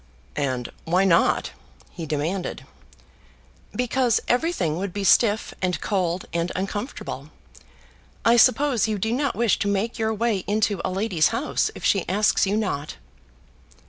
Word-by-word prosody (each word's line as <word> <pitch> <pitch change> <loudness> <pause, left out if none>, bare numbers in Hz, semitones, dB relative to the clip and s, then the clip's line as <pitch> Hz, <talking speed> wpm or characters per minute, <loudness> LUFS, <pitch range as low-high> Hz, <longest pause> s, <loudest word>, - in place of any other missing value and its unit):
"And 130 -4 -2
why 180 +4 +2
not?" 170 -3 +3 0.4
he 165 -3 -7
demanded. 160 +6 -3 1.1
"Because 250 -1 +1
everything 245 - 0
would 195 +1 -3
be 205 - -3
stiff, 215 +2 +3
and 180 -1 0
cold, 185 -3 -1
and 170 +1 -1
uncomfortable. 205 +6 -5 1.0
I 230 +1 +6
suppose 255 0 +4
you 215 -1 -1
do 220 +3 -1
not 275 +2 0
wish 235 -2 +2
to - - -1
make 200 +4 -1
your 220 0 +1
way 225 -1 +1
into 205 -2 +1
a - - -1
lady's 185 -4 +1
house - - 0
if - - -7
she - - +2
asks 205 +1 +2
you 205 +2 +1
not." 155 -9 -2
200 Hz, 145 wpm, -24 LUFS, 180-230 Hz, 1.1 s, I